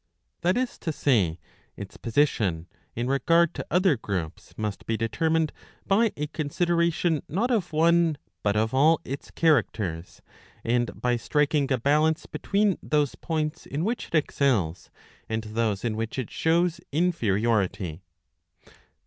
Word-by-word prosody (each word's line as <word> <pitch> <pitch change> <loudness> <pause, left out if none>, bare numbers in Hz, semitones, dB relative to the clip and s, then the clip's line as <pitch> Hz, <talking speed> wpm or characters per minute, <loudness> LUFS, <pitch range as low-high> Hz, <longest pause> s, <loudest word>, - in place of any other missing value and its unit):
^ - - -47
That 180 +5 +2
is 255 0 -2
to 160 - -2
say, 105 - +1 0.4
its - - -8
position 110 - 0 0.2
| - - -40
in 120 - -2
regard 165 +6 +3
to - - -5
other 180 -1 +3
groups 95 -8 -5
must 105 -3 -4
be 115 - 0
determined 155 +9 0 0.3
by 215 +2 +3
a 150 - -1
consideration 170 +1 0
not/ 225 - 0
of 200 -8 0
one 165 0 +3 0.2
but 100 0 +1
of 110 +2 +1
all 155 +5 +4
its 135 +1 -6
characters, 105 - 0 0.4
and 120 +1 0
by 125 -1 +1
striking 145 +2 +1
a 130 - +3
balance 150 +6 +2
between 200 -1 0
those 150 -2 +1
points 155 -2 -3
in 150 +5 -2
which 235 +3 -2
it - - -4
excels 120 - +1 0.4
and 110 0 -2
those 110 -1 -1
in 110 -2 -1
which 115 +3 -4
it 130 -4 -4
shows 170 +1 +1
inferiority. 110 - 0
145 Hz, 145 wpm, -26 LUFS, 110-165 Hz, 0.4 s, all